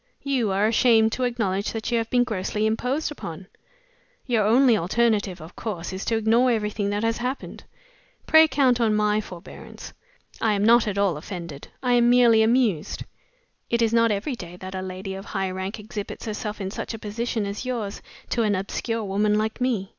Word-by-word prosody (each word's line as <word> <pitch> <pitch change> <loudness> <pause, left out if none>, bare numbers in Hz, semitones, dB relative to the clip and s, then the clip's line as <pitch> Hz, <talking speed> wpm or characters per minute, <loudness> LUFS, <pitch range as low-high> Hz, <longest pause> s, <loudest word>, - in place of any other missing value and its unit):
"You 265 -6 0
are 195 +2 +2
ashamed 225 0 +4
to 255 - -1
acknowledge 205 -5 -1
that 225 +1 -4
you 235 - +2
have 225 0 -3
been 245 -1 +3
grossly 210 -2 -2
imposed 250 +8 -1
upon. 175 - -7 0.8
Your 235 -5 +2
only 240 +3 +5
alternative, 205 0 +1
of 160 +2 -11
course, 185 -6 -5
is 190 - -5
to 225 - +1
ignore 225 +3 +3
everything 210 -3 -1
that 205 +1 -1
has 225 0 +1
happened. 250 +3 -5 0.6
Pray 315 0 +7
count 255 -5 +2
on 220 -2 +3
my 210 0 +2
forbearance. 180 -4 -11 0.5
I 220 -2 +2
am 200 0 +1
not 235 0 +5
at 200 -1 -2
all 195 -6 +2
offended 170 -3 -8 0.2
I 250 -1 +2
am 240 0 +4
merely 240 -2 +6
amused. 220 -8 +1 0.7
It 235 0 +2
is 225 0 +1
not 230 0 +4
every 215 +6 -1
day 180 -5 -9
that 185 +1 -8
a 190 - -3
lady 190 +1 -6
of 195 0 -7
high 195 -1 -2
rank 190 +3 -4
exhibits 210 -1 -7
herself 215 -1 -4
in 190 -1 -4
such 225 - -5
a - - -6
position 220 +1 -3
as 200 +3 -4
yours 235 -6 -4 0.3
to 235 - +1
an 210 -2 +2
obscure 220 +4 -3
woman 210 +1 +1
like 220 +3 -2
me. 225 -7 0
215 Hz, 190 wpm, -24 LUFS, 195-235 Hz, 0.8 s, Pray